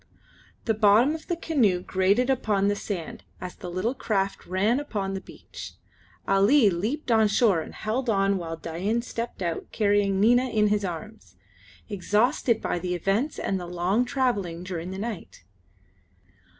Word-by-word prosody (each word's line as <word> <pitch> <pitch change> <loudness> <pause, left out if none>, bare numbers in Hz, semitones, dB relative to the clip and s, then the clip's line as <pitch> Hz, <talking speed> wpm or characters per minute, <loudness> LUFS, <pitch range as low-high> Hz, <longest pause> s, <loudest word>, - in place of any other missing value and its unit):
The 225 - +2
bottom 215 +6 +4
of 320 0 -8
the 345 - 0
canoe 255 - +1
grated 200 +9 +2
upon 210 -6 +1
the 205 - +1
sand 190 -5 -5 0.2
as 180 -1 -6
the 180 - -8
little 185 +8 -1
craft 200 -6 -2
ran 205 +8 +1
upon 205 -9 -3
the 190 - -4
beach. - - -11 0.5
Ali 200 +4 +5
leaped 235 - -2
on 220 -1 +5
shore 205 -4 +3
and - - -9
held 235 +4 -2
on 195 -2 +2
while 165 -1 -5
Dain 190 +9 -2
stepped 230 -5 -5
out 170 -2 -3
carrying 205 -2 +2
Nina 245 +5 +4
in 210 -2 +2
his 210 0 +1
arms, 195 - -7 0.5
exhausted 215 +4 +1
by - - -1
the 180 +1 -2
events 200 - 0
and 195 - -1
the 175 - -6
long 180 +6 +1
travelling 205 -10 -1
during 180 -2 -5
the 190 - -6
night. 205 - -6
205 Hz, 160 wpm, -26 LUFS, 185-235 Hz, 0.5 s, Ali